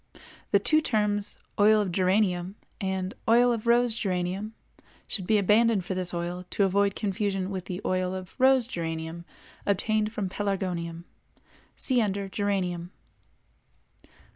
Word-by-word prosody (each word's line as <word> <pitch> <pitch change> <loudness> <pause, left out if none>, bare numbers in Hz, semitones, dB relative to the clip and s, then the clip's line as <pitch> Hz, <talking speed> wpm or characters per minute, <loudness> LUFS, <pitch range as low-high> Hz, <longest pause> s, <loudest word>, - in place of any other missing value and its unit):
—The - - +5
two 310 +10 +3
terms 210 -5 +1 0.2
"Oil 215 +1 +6
of 200 -3 -1
Geranium" 185 0 +1 0.3
and 190 -1 -2 0.2
"Oil 240 +1 +5
of 230 0 -4
Rose 240 0 +4
Geranium" 195 +1 -2 0.5
should 190 -5 -3
be 215 - +4
abandoned 210 0 +3
for 190 - -2
this 185 -1 -1
oil, 175 +1 -4
to 200 - +1
avoid 200 +1 +2
confusion 195 -2 -2
with 185 -2 -4
the 180 +1 -5
"Oil 185 0 0
of 185 -1 -8
(Rose) 260 -1 +5
Geranium" 165 -4 -5 0.4
obtained 215 +2 +1
from 210 -3 -3
Pelargonium. 180 -4 -3 0.7
See 255 -3 +1
under 200 -2 -1
"Geranium." 190 -4 -2
195 Hz, 135 wpm, -27 LUFS, 180-215 Hz, 0.7 s, Oil